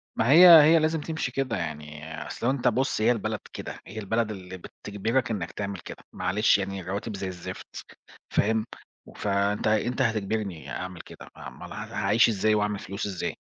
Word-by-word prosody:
ما 120 +4 +2
هي 180 +4 +10 0.2
هي 160 +2 +6
لازم 155 0 0
تمشي 160 +1 -3
كده 130 -6 -1
يعني، 75 +1 -6
أصل - - -6
لو 130 - +4
أنت 130 -2 0
بُصّ 130 -1 +1
هي 110 - +4
البلد 115 -4 -2
كده، - - -7
هي 110 +3 -7
البلد 110 +2 -1
اللي 95 -2 -8
بتجبرك 110 +7 -3
إنك 95 -6 -3
تعمل 100 -2 -5
كده، - - -10
معلش 95 +5 +2
يعني 100 -1 -4
الرواتب 100 +4 -4
زي 95 0 -4
الزفت، 95 0 -8 0.4
فاهم، 110 +1 +1 0.5
فأنت 100 +1 0
أنت 115 +4 +1
هتجبرني 105 -6 -2
أعمل 90 -2 -6
كده، - - -13
ما - - -9
امّال - - -10
ل - - -8
هاعيش 110 +4 +2
إزاي، 110 0 +2
وأعمل 105 -1 0
فلوس 100 +1 -5
إزاي؟ 95 -3 -3
105 Hz, 180 wpm, -26 LUFS, 95-115 Hz, 0.5 s, هي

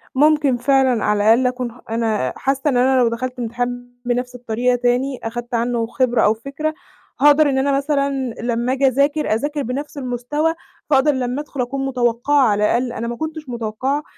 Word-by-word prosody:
ممكن 295 -3 +3
فعلًا 260 -2 +2
على 210 0 +1
الأقل 235 +4 +5
أكون 250 -1 -3
ح 245 - -17
أنا 220 - -1
حاسّة 270 0 -1
إن 250 - +1
أنا 260 +1 +3
لو 235 - +4
دخلت 250 +2 -4
امتحان 245 +1 -3
بنَفْس 250 +1 -2
الطريقة 245 +1 0
تاني 245 +2 0
أخدت 240 +2 -5
عنّه 235 -1 0
خبرة 245 0 +1
أو 210 - +4
فكرة 280 +7 -4 0.5
هاقدر 295 0 +6
إن 265 - 0
أنا 275 +1 +2
مثلًا 275 -3 -1
لمّا 240 +2 0
آجي 270 0 +2
أذاكر، 280 0 +1
أذاكر 290 +5 -2
بنَفْس 280 +5 -5
المستوى، 270 +5 -1 0.4
فاقدر 290 +1 +4
لمّا 255 +2 -2
أدخُل 280 -3 -5
أكون 270 +2 -2
متوقعة، 250 +2 +1
على 205 0 +1
الأقل 240 +2 0
أنا 235 -1 -4
ما 235 - -3
كنتش 315 -1 -6
متوقّعة 240 +5 -2
250 Hz, 180 wpm, -20 LUFS, 240-275 Hz, 0.5 s, هاقدر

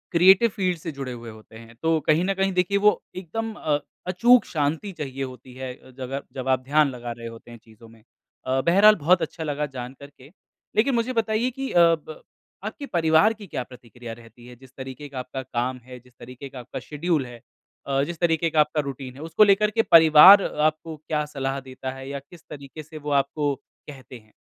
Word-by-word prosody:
Creative 190 +6 +6
field 185 -3 0
से 165 +1 -6
जुड़े 135 -3 -6
हुए 120 -1 -8
होते 110 0 -16
हैं, 115 +1 -14
तो 160 0 +2
कहीं 155 +2 +3
न 195 - +1
कहीं 195 0 0
देखिए 185 +2 +1
वो 210 +1 +3
एकदम 220 +5 -5
अ, 150 -7 -1 0.3
अचूक 235 +7 +4
शांति 155 +6 -2
चाहिए 135 -4 -5
होती 130 -1 -9
है 130 0 -6
अ, - - -19
जगह 130 +2 -5
जब 130 -1 -6
आप 130 0 +3
ध्यान 145 +2 +3
लगा 120 -2 -7
रहे 115 0 -8
होते 115 +1 -12
हैं 120 - -11
चीज़ों 115 0 -17
में। 110 -1 -20 0.4
अ, 130 +1 +1
बहरहाल 200 +7 +6
बहुत 175 +3 +4
अच्छा 165 - -4
लगा 150 -1 -2
जान 125 +1 -6
कर 140 - -11
के, 140 0 -18 0.4
लेकिन 240 +5 +2
मुझे 235 +2 -1
बताइए 225 +1 0
कि 270 +2 -5
अ, 175 - +3
प 165 -2 +1 0.4
आपके 220 +7 -6
परिवार 170 - +3
की 215 -2 -12
क्या 135 - -4
प्रतिक्रिया 120 -1 -11
रहती 115 +1 -16
है? 125 - -12
जिस 130 +1 -18
तरीके 130 +2 -8
का 135 -2 -6
आपका 125 +1 -6
काम 125 0 -3
है, 125 0 -11
जिस 125 +1 -24
तरीके 125 +3 -10
का 130 - -10
आपका 120 - -7
शेड्यूल 150 +2 -2
है 120 -1 -12 0.5
अ, 135 0 +1
जिस 165 +2 -6
तरीके 165 -1 +1
का 155 - 0
आपका 150 0 +2
रूटीन 135 -2 -7
है, 140 - -11
उसको 165 +6 +3
लेकर 210 +1 +4
के 225 - +2
परिवार 165 +4 +9
आपको 155 +1 -1
क्या 150 0 -3
सलाह 135 -2 -3
देता 130 0 -7
है 135 0 -9
या 140 0 -4
किस 175 -3 -15
तरीके 145 +1 -9
से 155 +1 -11
वो 150 -1 -5
आपको 145 +1 -2 0.3
कहते 130 -3 -11
हैं? 110 -1 -27
145 Hz, 215 wpm, -24 LUFS, 130-175 Hz, 0.5 s, परिवार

